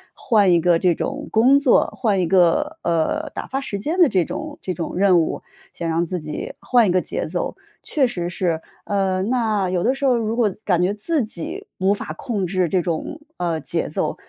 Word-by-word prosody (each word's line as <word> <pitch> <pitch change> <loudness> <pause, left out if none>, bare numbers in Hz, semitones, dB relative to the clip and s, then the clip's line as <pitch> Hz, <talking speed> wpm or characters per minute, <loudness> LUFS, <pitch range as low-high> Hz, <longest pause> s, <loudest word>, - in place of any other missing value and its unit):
换 205 -6 +3
一 170 - +5
个 170 0 +3
这 175 -3 +2
种 - - -4
工 255 +6 +5
作， 275 -4 +4
换 210 -6 +1
一 180 - +2
个， 195 - +2
呃， 175 - 0
打 - - -6
发 270 +1 -3
时 200 -6 -4
间 315 - -2
的 335 -6 +6
这 180 -3 +2
种 310 -1 -6
这 185 - -3
种 165 +1 -5
任 190 -3 +5
务， - - -3 0.3
想 170 - -4
让 165 +1 +1
自 180 +1 -3
己 150 0 -6
换 240 -4 +3
一 - - +2
个 185 - +3
节 - - -4
奏。 - - -3 0.3
确 280 -4 +1
实 175 -8 -3
是， 170 -3 -1 0.2
嗯， 195 -1 0
那 215 -6 +1
有 175 -1 0
的 260 +3 +2
时 275 - -2
候 255 -2 +4
如 225 -1 -1
果 225 -5 +2
自 210 - -16
感 180 -3 +2
觉 195 +3 +1
自 275 +6 0
己 180 -6 -6
无 195 +2 +3
法 155 - -5
控 205 -4 -2
制 180 -2 0
这 185 - +2
种， 175 - -3 0.2
呃， 170 -3 -1
节 - - -2
奏， - - -2
195 Hz, 235 characters per minute, -21 LUFS, 175-245 Hz, 0.3 s, 的